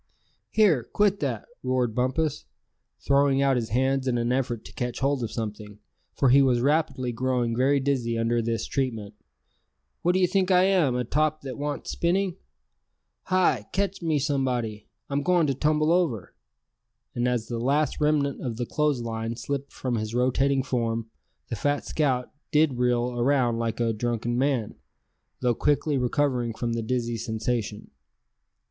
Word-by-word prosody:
"Here, 185 - +3
quit 205 - +1
that!" 125 -7 -2 0.2
roared 125 -3 0
Bumpus, 130 - -1 0.6
throwing 140 -1 +3
out 135 -1 +3
his 120 -2 -2
hands 130 +3 +1
in 125 -1 +1
an 120 +1 0
effort 120 -3 -1
to - - -11
catch 125 -1 -3
hold 140 0 +1
of 115 -2 -3
something, 105 -2 -5 0.4
for 135 - +3
he 135 +3 +7
was 130 -3 +3
rapidly 140 -2 +1
growing 120 -1 0
very 135 +3 +3
dizzy 130 -4 0
under 115 +1 +1
this 115 -1 -2
treatment; 115 -7 -3 0.9
"what 175 - +2
d'ye 185 0 +4
think 190 +1 +1
I 180 -1 +5
am, 180 -10 +3
a 125 - 0
top 155 +5 0
that 130 -3 -6
wants 145 0 -4
spinning? 185 +1 0 0.9
Hi! 180 - +2
ketch 195 -1 -1
me 160 -3 +1
somebody, 130 -7 -1 0.2
I'm 140 0 -1
going 175 +1 +3
to 140 - +1
tumble 155 +3 +1
over!" 165 - 0 0.8
and 120 +1 0
as 120 -3 0
the 120 -1 -3
last 140 +5 0
remnant 150 -2 +1
of 120 -4 -4
the 120 - -2
clothes 150 -1 0
line 115 0 -3
slipped 140 +3 -4
from 125 -3 -2
his 110 +1 -3
rotating 135 +2 +2
form, 115 -3 -2 0.4
the 115 - -2
fat 145 +6 -1
scout 130 -5 0 0.2
did 150 -5 +3
reel 125 0 +1
around 120 -2 +2
like 115 0 -2
a 115 -1 +1
drunken 120 +1 -2
man, 130 -4 0 0.7
though 125 -1 +2
quickly 145 +4 +1
recovering 125 -2 0
from 120 0 -2
the 115 - -1
dizzy 120 0 -2
sensation. 110 -1 -3
130 Hz, 160 wpm, -26 LUFS, 120-145 Hz, 0.9 s, he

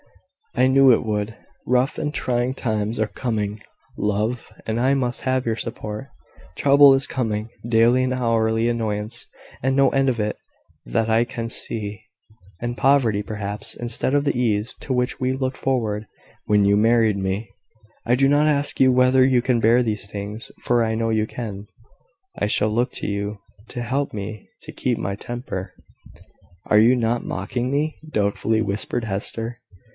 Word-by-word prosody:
I 125 - +4
knew 135 0 +6
it 115 - +3
would. 105 0 -2 0.3
Rough 125 +2 +1
and 150 0 -2
trying 125 -1 -1
times 110 -2 -2
are 110 - +1
coming, 110 -4 -3 0.4
love, 105 +4 -1
and 110 +1 -1
I 135 +2 +3
must 125 -2 -1
have 130 0 0
your 115 -1 0
support. 110 +1 -6 0.5
Trouble 140 0 +7
is 135 - +3
coming 110 -3 -2 0.2
daily 120 +2 +4
and 130 0 0
hourly 115 -2 +1
annoyance, 110 0 -2 0.4
and 135 0 +2
no 135 -1 +5
end 135 -1 +2
of 120 -3 -1
it 105 0 -1 0.5
that 65 - 0
I 110 +1 +4
can 115 -1 -5
see: 105 -2 -4 0.6
and 120 0 -3
poverty, 120 -7 +3
perhaps, 105 0 -5
instead 120 +2 0
of 145 0 +2
the 140 - 0
ease 110 -2 0
to - - -5
which 125 -1 0
we 130 0 +1
looked 130 0 -2
forward 110 -5 -1 0.4
when 105 -1 +4
you 100 0 +4
married 110 0 +3
me. 95 +3 -2 0.6
I 120 - +3
do 135 +2 +3
not 145 +2 +3
ask 145 -1 +1
you 130 -1 +6
whether 130 +1 +4
you 130 -2 +4
can 125 -1 +1
bear 115 +3 +5
these 105 -3 -3
things, 105 +2 -6
for 120 -1 +2
I 110 0 0
know 115 0 0
you 110 -1 +1
can. 105 -4 -6 0.7
I - - 0
shall 105 0 +2
look 120 +4 0
to - - -4
you 100 +1 -3 0.3
to 120 -1 -4
help 135 +4 -1
me 105 0 -6
to - - -9
keep - - -1
my 100 +2 -3
temper." 100 -5 -6 0.9
"Are 105 - +4
you 120 +4 +6
not 120 -1 0
mocking 125 +1 -3
me?" 150 +2 -1
doubtfully 105 +1 +1
whispered 105 +3 -2
Hester. 115 +3 -3
115 Hz, 170 wpm, -22 LUFS, 105-130 Hz, 0.9 s, Trouble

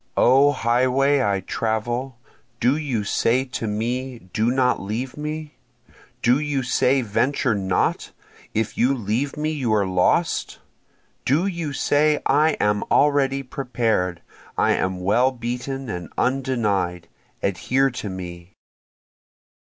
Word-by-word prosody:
O 135 +3 +5
highway 130 +3 +2
I 100 -5 +1
travel, 120 +5 -2 0.4
do 125 +4 +3
you 135 -9 -2
say 120 +5 +1
to 125 -3 -4
me 120 0 -3
Do 110 +2 +2
not 125 0 +2
leave 115 +7 -4
me? 150 0 -6 0.7
Do 125 +4 +4
you 145 -3 -1
say 130 +2 +2
Venture 120 +3 +1
not 95 -3 0 0.4
if 110 0 -2
you 130 +3 +3
leave 120 +6 -2
me 155 +1 -1
you 135 -7 -1
are 100 -2 +2
lost? 90 -1 +1 0.7
Do 150 +8 +2
you 170 -6 -3
say 150 +2 +2
I 150 +3 +4
am 105 0 +1
already 140 -2 +3
prepared, 115 -9 -1 0.3
I - - +3
am 95 -1 -1
well 120 +8 +3
beaten 125 +2 -4
and 90 -5 -5
undenied, 105 -10 0 0.4
adhere 130 +8 +1
to 115 -4 -5
me? 90 -1 -8
125 Hz, 125 wpm, -23 LUFS, 105-135 Hz, 0.7 s, O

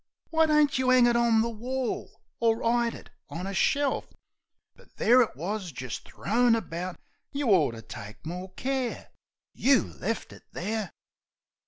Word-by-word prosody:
Why 320 -1 +4
don't 300 -3 +3
you 260 -1 +2
'ang 255 -1 +6
it 240 0 +3
on 235 -2 +4
the 235 - -1
wall, 250 +3 -4 0.2
or 230 0 +2
'ide 235 0 +2
it - - -13 0.2
on 175 +3 -5
a 195 - -4
shelf? 280 +8 +1 0.7
But - - -22
there 250 +3 +6
it 230 - 0
wus, 185 +4 -4
jist 130 -3 -6
thrown 235 +2 +2
about. 180 -4 -4 0.3
You 280 -3 -1
ort 155 - +4
to 115 - -10
take 105 +5 -10
more 180 +3 -6
care! 260 -1 -3 0.4
You 270 0 +4
left 225 -1 -4
it - - -14
there! 210 +1 -3
230 Hz, 160 wpm, -28 LUFS, 185-255 Hz, 0.7 s, ang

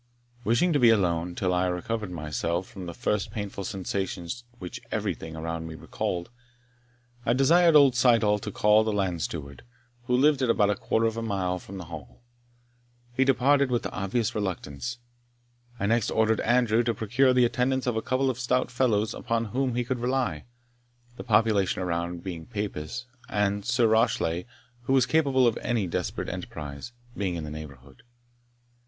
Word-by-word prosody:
Wishing 120 +11 +2
to 145 - +3
be 120 -2 +6
alone, 90 -5 +1
till 90 -2 0
I 90 +1 +2
recovered 105 +4 -3
myself 85 +2 -2
from 95 -2 -9
the 85 - -5
first 105 -2 -1
painful 100 -3 -5
sensations 95 +2 -4
which 90 -5 -7
everything 80 0 -3
around 80 0 -4
me 80 - -7
recalled, 85 +5 -4 0.9
I 120 - +2
desired 165 +6 +5
old 140 -3 +7
Syddall 115 -4 +4
to - - -6
call 105 +1 +4
the 110 - -1
land 95 -5 -1
steward, 70 -5 -5 0.4
who 125 0 +2
lived 145 +1 +4
at 130 - +1
about 105 -3 +3
a - - 0
quarter 115 - 0
of 115 0 0
a - - -2
mile 95 -5 -1
from 95 +2 -10
the 90 - -7
Hall. 75 - -10 0.9
He 130 - +3
departed 135 +1 +3
with 120 -2 0
obvious 105 +3 -1
reluctance. 100 - -4 0.8
I 100 - 0
next 115 +1 +2
ordered 110 0 +2
Andrew 120 -2 +3
to 115 -1 0
procure 120 +6 +2
the 125 -1 +4
attendance 130 +2 0
of 125 -2 0
a 110 - 0
couple 130 +3 +1
of 125 - -8
stout 125 0 0
fellows 110 -5 +1
upon 115 0 -1
whom 130 -2 0
he 125 - +1
could 125 +1 -3
rely, 130 +2 -1 0.7
the - - -8
population 105 -4 +2
around 85 0 -3
being 85 -4 -6
Papists, 105 +2 -4 0.2
and 100 -1 0
Sir 120 0 +2
Rashleigh, 110 -6 +1 0.4
who 135 - +1
was 130 -3 +5
capable 135 -3 +3
of 115 -2 +2
any 120 -5 -1
desperate 85 - -3
enterprise, 70 +7 -6 0.2
being 95 -3 -2
in 80 - -4
the 75 - -6
neighbourhood. 70 -4 -10
110 Hz, 170 wpm, -27 LUFS, 90-125 Hz, 0.9 s, old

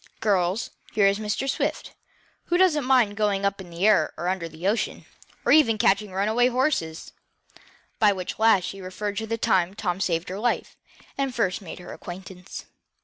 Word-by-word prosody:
Girls, 195 0 +1 0.2
here 205 - +3
is 195 +1 +3
Mr. 215 +5 -2
Swift, 275 - -2 0.5
who 350 - +1
doesn't 330 -7 +3
mind 250 -6 +3
going 200 -2 0
up 200 0 -1
in 180 - -11
the 170 +3 -2
air 205 -8 +3
or 175 +3 -2
under 180 -3 -2
the 160 +4 -5
ocean, 215 +3 -1 0.4
or - - +3
even 275 -7 +5
catching 200 0 +2
runaway 215 +6 +2
horses," 250 - -1 0.9
by 210 -2 +5
which 185 0 -5
last 220 -4 +5
she 195 +2 -6
referred 200 +3 -4
to 220 - -3
the 230 +1 -2
time 190 -5 +1
Tom 185 -3 -2
saved 170 -2 -1
her 190 +2 -5
life, 240 +2 -1 0.4
and 270 -2 -1
first 195 -3 0
made 185 - -8
her 180 - -9
acquaintance. 185 +1 -9
200 Hz, 180 wpm, -25 LUFS, 185-225 Hz, 0.9 s, even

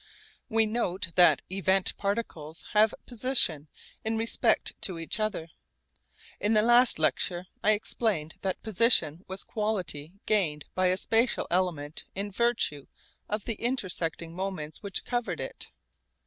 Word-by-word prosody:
We 225 -1 +3
note 195 -6 -1
that 175 +1 +5
event 190 0 +1
particles 200 -7 -3
have 215 0 +5
'position' 235 - +2 0.4
in 220 0 -1
respect 225 +1 +1
to 185 -3 0
each 165 +6 -2
other. 210 -6 -2 0.9
In 210 +2 +1
the 215 - +5
last 240 +1 +5
lecture 175 +3 +1 0.2
I 215 - +5
explained 205 -7 -1
that 190 -1 -3
'position' 195 -7 +3
was 190 0 -5
quality 185 -8 -3
gained 160 -9 0
by 185 0 +2
a 185 +1 +2
spatial 230 +5 +2
element 170 -5 -1
in 200 +1 -3
virtue 210 - 0 0.4
of 210 0 -3
the 230 -3 -4
intersecting 170 -9 -1
moments 180 -5 -5
which 200 -2 -3
covered 245 -1 -2
it. - - -6
195 Hz, 135 wpm, -28 LUFS, 170-220 Hz, 0.9 s, that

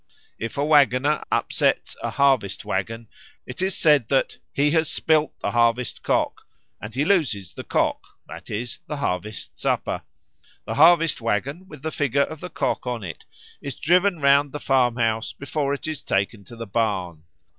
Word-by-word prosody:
If 115 - -5
a 140 - +1
waggoner 145 -1 +3
upsets - - +1
a - - -2
harvest 135 -8 +1
waggon, 115 +4 -3 0.4
it 125 +7 -7
is 190 0 0
said 150 -7 +4
that 135 +1 0
"he 145 +1 +2
has 160 -1 +2
spilt 155 -2 +1
the - - -1
Harvest 120 0 +1
cock," - - 0 0.4
and 110 +2 -8
he 140 +3 +1
loses 135 - +1
the - - -7
cock, - - 0 0.2
that - - -10
is, 115 +2 -4
the 150 - -4
harvest 105 -4 -4
supper. - - -1 0.6
The - - -3
harvest 165 -1 +5
waggon, 135 - -2
with 150 -5 -12
the 160 - -2
figure 140 -1 +1
of 160 +1 -6
the 180 - -7
cock 140 - -2
on 120 -3 -3
it, 85 -3 -8 0.4
is 140 -3 -6
driven 180 +2 +3
round 140 0 +4
the 150 - -4
farmhouse 120 -5 +1
before 140 0 -2
it 140 - -3
is 155 -3 -3
taken 100 +2 -1
to 120 - -11
the 115 0 -6
barn. 95 -7 -1
135 Hz, 170 wpm, -23 LUFS, 115-150 Hz, 0.6 s, harvest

